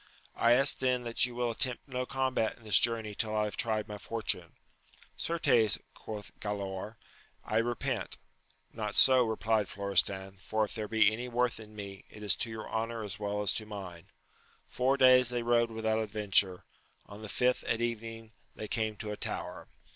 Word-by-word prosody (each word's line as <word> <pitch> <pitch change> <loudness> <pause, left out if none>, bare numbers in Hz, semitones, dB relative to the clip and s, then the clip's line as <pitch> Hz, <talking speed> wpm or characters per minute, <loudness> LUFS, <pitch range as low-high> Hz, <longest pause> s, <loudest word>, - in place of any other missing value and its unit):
— - - -27
I 115 +1 +4
ask 135 +3 +5
then, 125 -1 +1
that 120 +1 +1
you 120 - -10
will 120 -1 -1
attempt 125 +3 0
no 125 -1 -3
combat 130 -4 -1
in 115 - -20
this 105 -2 +4
journey 115 -3 +1
till 110 +1 -2
I 105 - +2
have 105 - -3
tried 110 -2 -1
my 105 -1 -7
fortune. 115 +1 -1 0.6
Certes, 120 -10 +2 0.2
quoth 105 -2 -8
Galaor, 100 0 -5 0.5
I 110 - -1
repent. 120 +1 -2 0.6
Not 105 -2 -4
so, 130 -1 +8
replied 110 -2 0
Florestan, 100 -1 +1
for 110 +3 -1
if 105 - -4
there 110 -2 -4
be 110 0 +4
any 120 +3 -5
worth 120 -1 0
in 110 -1 -13
me, 100 -2 -8
it 105 - -12
is 105 - +4
to 115 - -1
your 110 -1 -7
honour 115 0 -3
as 100 0 -6
well 105 0 -2
as 95 - +4
to 110 - 0
mine. 95 -5 -9 0.6
Four 130 +2 +1
days 130 -2 +6
they 120 -1 -2
rode 120 0 +2
without 110 -1 -1
adventure; 100 -4 +1 0.4
on 100 +1 -12
the 110 - -7
fifth 125 +4 +1
at 115 - 0
evening 115 -1 -4 0.2
they 110 - -6
came 110 -1 -2
to 105 0 -6
a - - -3
tower. - - -4
110 Hz, 185 wpm, -31 LUFS, 105-120 Hz, 0.6 s, so